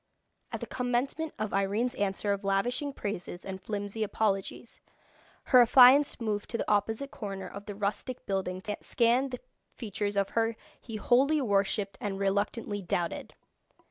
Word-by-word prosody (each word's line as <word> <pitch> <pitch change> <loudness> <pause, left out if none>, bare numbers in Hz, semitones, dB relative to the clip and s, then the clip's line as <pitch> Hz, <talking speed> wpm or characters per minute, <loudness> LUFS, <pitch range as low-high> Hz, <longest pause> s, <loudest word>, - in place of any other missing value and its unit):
At - - -4
the - - -3
commencement 255 +6 -1
of 215 -1 -3
Irene's 200 +5 +1
answer 200 0 0
of 200 +1 -5
lavishing 240 +9 0
praises 195 -7 -5
and 190 -1 -6
flimsy 205 +1 -4
apologies, 210 +1 -1 0.6
her 255 -2 +7
affianced 260 +4 +7
moved 210 -3 -2
to 230 - -2
the - - -3
opposite 220 +6 0
corner 195 -3 -6
of 200 +1 -9
the 205 - -5
rustic 210 +5 -3
building 185 -1 -2
to 210 +1 -3
scan 245 +3 +2
the 250 -1 -5 0.4
features 205 -2 -3
of 200 0 +2
her 225 0 0 0.3
he 225 - -8
wholly 265 +8 +3
worshipped 200 -4 0
and 200 -2 -2
reluctantly 205 +2 -1
doubted. 175 -2 -3
210 Hz, 150 wpm, -29 LUFS, 195-245 Hz, 0.6 s, her